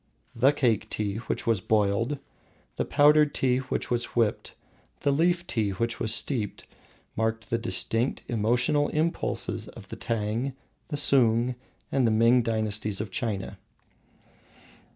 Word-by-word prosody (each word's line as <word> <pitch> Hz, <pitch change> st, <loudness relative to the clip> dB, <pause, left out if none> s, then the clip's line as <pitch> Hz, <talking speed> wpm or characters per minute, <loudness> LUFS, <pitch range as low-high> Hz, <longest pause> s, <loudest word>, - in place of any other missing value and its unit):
The 130 Hz, +3 st, +4 dB
Cake 120 Hz, -7 st, 0 dB
tea 105 Hz, -1 st, -2 dB
which -, -, -2 dB
was 115 Hz, -5 st, +1 dB
boiled, 110 Hz, +7 st, +1 dB, 0.6 s
the -, -, -1 dB
Powdered 150 Hz, 0 st, +4 dB
tea 125 Hz, -1 st, +2 dB
which 130 Hz, -1 st, -4 dB
was 120 Hz, 0 st, +1 dB
whipped, 115 Hz, -3 st, 0 dB, 0.5 s
the 140 Hz, -, +2 dB
Leaf 170 Hz, +4 st, +1 dB
tea 110 Hz, -10 st, -1 dB
which 115 Hz, +5 st, -2 dB
was 110 Hz, -, 0 dB
steeped, 110 Hz, -2 st, -1 dB, 0.5 s
mark 110 Hz, 0 st, -1 dB
the 115 Hz, +1 st, -2 dB
distinct 115 Hz, +1 st, 0 dB
emotional 120 Hz, +6 st, +1 dB
impulses 160 Hz, +2 st, -1 dB
of -, -, -12 dB
the -, -, -6 dB
Tang, 115 Hz, +4 st, -2 dB, 0.3 s
the 145 Hz, -, -3 dB
Sung, 120 Hz, -3 st, +3 dB, 0.4 s
and 130 Hz, -3 st, +2 dB
the -, -, +2 dB
Ming 115 Hz, +3 st, +4 dB
dynasties 110 Hz, -3 st, -1 dB
of 105 Hz, -1 st, -4 dB
China. 105 Hz, -5 st, -3 dB
115 Hz, 135 wpm, -27 LUFS, 110-135 Hz, 0.6 s, The